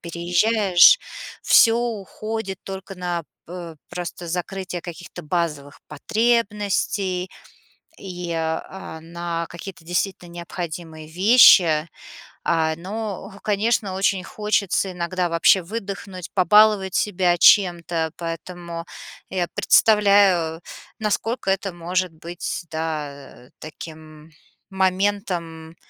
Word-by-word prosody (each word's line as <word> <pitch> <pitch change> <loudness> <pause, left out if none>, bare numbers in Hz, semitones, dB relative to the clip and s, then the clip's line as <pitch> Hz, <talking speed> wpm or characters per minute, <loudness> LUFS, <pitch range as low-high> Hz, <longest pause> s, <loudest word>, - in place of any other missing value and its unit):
переезжаешь, 180 - +4 0.4
всё 230 0 +6 0.4
уходит 215 -3 -4
только 195 0 -7
на 175 -1 -3
п - - -31 0.3
э, 170 -3 -8
просто 175 0 -6
закрытие 180 +1 -4
каких-то 175 0 -9
базовых 150 -3 -3
потребностей, 200 -1 0 0.7
и, 180 -2 -6
э, - - -2
а, 160 +1 -4
на 170 0 -4
какие-то 170 -1 -10
действительно 175 0 -2
необходимые 170 -2 -7
вещи. 175 -4 +6 0.6
Э, 160 -1 +1
но, 200 +2 -6
конечно, 210 -1 0
очень 190 -1 0
хочется 210 -2 0
иногда 180 +1 -2
вообще 170 +3 +4
выдохнуть, 195 -2 -7
побаловать 200 +1 +4
себя 180 -4 +1
чем-то. 170 -5 +4
Поэтому 170 0 -6 0.5
я 180 -2 -1
представляю, 200 -6 +4 0.4
насколько 220 +1 -2
это 195 0 -1
может 175 +1 -2
быть, 170 +2 -6
да, 150 -5 -6
таким 155 0 -11 0.4
моментом 185 -4 -1
180 Hz, 95 wpm, -22 LUFS, 165-195 Hz, 0.7 s, всё